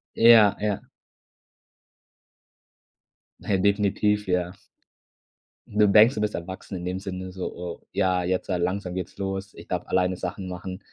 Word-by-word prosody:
Ja. 115 -3 +7
Ja. 105 -2 -1 2.6
Na, 100 - 0
definitiv, 105 +1 +1
ja. 90 0 0 1.1
Du 105 0 +3
denkst, 110 +5 +6
du 105 - -3
bist 105 0 -1
erwachsen 95 +2 -6
in 90 - -6
dem 90 +1 -2
Sinne 95 -1 -6
so: 95 0 -4
„Oh, 85 -1 -7
ja, 95 -2 +1
jetzt, 90 +1 -1
äh, 90 - +1
langsam 90 +1 -2
geht's 95 -2 -5
los. 95 0 -4
Ich - - -12
darf - - -3
alleine 90 0 +1
Sachen 95 +1 -5
machen.” 90 +1 -6
95 Hz, 145 wpm, -25 LUFS, 90-105 Hz, 2.6 s, Ja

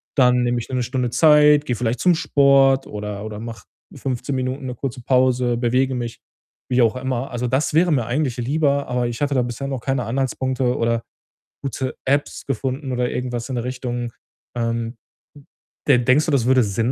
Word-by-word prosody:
dann 125 -2 +4
nehme 120 0 +1
ich - - -7
mir 130 - -3
'ne 125 - 0
Stunde 125 0 -1
Zeit, 150 -1 +5
gehe 125 - -1
vielleicht 120 +1 -1
zum 180 -2 +4
Sport 135 -3 +4
oder 105 -1 -5
oder 105 -1 -6
mache 115 0 -8 0.3
15 135 +1 -3
Minuten 130 +1 -3
'ne 125 - -5
kurze 130 0 -5
Pause, 125 -1 +2
bewege 130 +2 +1
mich“, 120 -2 -5 0.5
wie 125 0 +4
auch 115 +1 +3
immer. 130 0 -3
Also, 120 0 -2
das 135 +5 0
wäre 170 +1 +4
mir 125 -6 +1
eigentlich 130 0 -1
lieber, 140 +2 +1
aber 125 -1 0
ich 120 +3 -5
hatte 145 -1 +1
da 125 - +3
bisher 120 +3 -4
noch 135 -3 -3
keine 135 -2 -1
Anhaltspunkte 130 0 -1
oder 115 0 0 0.6
gute 130 -1 -3
Apps 140 +2 0
gefunden 135 +1 -3
oder 125 0 0
irgendwas 125 -1 -3
in 130 - -3
der 120 - -2
Richtung. 120 -2 -4 0.5
Ähm, 115 0 -2 0.9
de 130 -4 +5
denkst 130 +5 +3
du, - - +1
das 130 -4 +2
würde 130 -1 +4
Sinn 110 +4 0
125 Hz, 190 wpm, -21 LUFS, 120-135 Hz, 0.9 s, Zeit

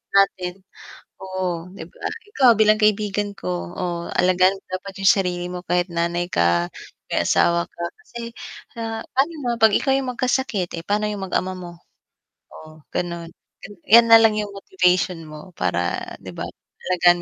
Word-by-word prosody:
natin, 185 -2 +2 0.6
oo, 185 -3 -3
'di 195 - -8
ba. - - -18 0.3
Ikaw 265 - +4
bilang 215 0 +5
kaibigan 210 -1 +1
ko, 90 - -5
oh, 175 -2 -3
alagaan 185 +1 +4
mo 195 - -12
dapat 195 +1 -10
yung 195 - +5
sarili 180 -2 -1
mo 180 0 -7
kahit 175 +1 0
nanay 170 +1 -1
ka, 85 0 +2 0.4
may - - 0
asawa 170 0 +3
ka, - - -13 0.2
kasi, 235 - -9 0.6
ah, 225 -1 -4
pa'no 280 +5 +3
naman 250 -7 -2
'pag 220 -2 +5
ikaw 270 - +2
yung 260 -2 -2
magkasakit, 245 -7 0
eh, 165 - -6
pa'no 210 +1 0
yung 205 -2 -4
mag-ama 185 0 -1
mo? 175 -1 -8 0.8
Oh 155 0 -14
ganun, 170 -1 -4 0.6
'yan 230 +2 +7
nalang 225 -1 +8
yung 210 -1 -3
motivation 185 -2 +1
mo 155 +4 -11
para 90 - -1 0.2
'di - - -7
ba - - -5 0.4
alagaan 175 -1 +4
185 Hz, 155 wpm, -22 LUFS, 175-210 Hz, 0.8 s, nalang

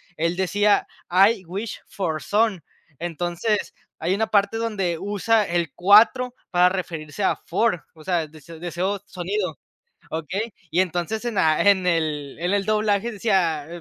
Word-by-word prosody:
él 170 +2 -1
decía: 205 +2 +2 0.2
"I 195 +3 +4
wish 195 +6 -5
for 160 -5 -3
son". 210 -5 +1 0.4
Entonces, 175 +5 -2 0.3
hay 175 +4 0
una 220 +2 +1
parte 205 +1 +2
donde 200 -7 -1
usa 210 +2 +1
el 170 -5 -1
4 225 +7 +5 0.2
para 180 0 +4
referirse 175 -2 -4
a - - +3
four, 225 -7 -1
o 155 - -15
sea, 170 -1 0
des 155 -1 -17
deseo 180 +4 -2
sonido, 185 -4 -3 0.5
okey. 190 +8 -3 0.2
Y 175 - +2
entonces 185 +4 -1
en 235 - -2
la 160 -5 +3
en 195 -2 +4
el 155 -5 -1
en 175 +4 0
el 200 -1 +1
doblaje 215 +1 +1
decía, 185 -8 +1
185 Hz, 150 wpm, -23 LUFS, 170-210 Hz, 0.5 s, 4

